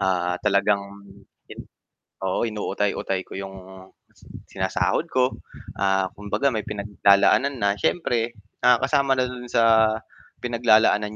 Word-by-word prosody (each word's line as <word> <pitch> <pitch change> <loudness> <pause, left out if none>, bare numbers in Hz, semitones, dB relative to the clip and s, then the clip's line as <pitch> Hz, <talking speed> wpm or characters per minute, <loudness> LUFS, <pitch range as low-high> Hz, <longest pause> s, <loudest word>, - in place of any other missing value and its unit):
ah, 90 -1 0
talagang 100 0 +2 1.4
oo, 95 +3 -1
inuutay-utay 105 -3 -2
ko - - -11
'yong 95 0 -7 0.9
sinasahod - - -1
ko, 130 0 +1 0.5
ah, 95 -1 +1
kumbaga 105 +7 -2
may 110 - -2
pinaglalaanan 100 +5 +2
na, 100 0 +1
siyempre, 120 -9 0 0.3
ah 125 -1 +6
kasama 140 -2 +1
na 130 - +2
do'n 125 -1 -8
sa 110 -1 +4 0.5
pinaglalaanan 110 -3 +2
105 Hz, 110 wpm, -23 LUFS, 100-120 Hz, 1.4 s, ah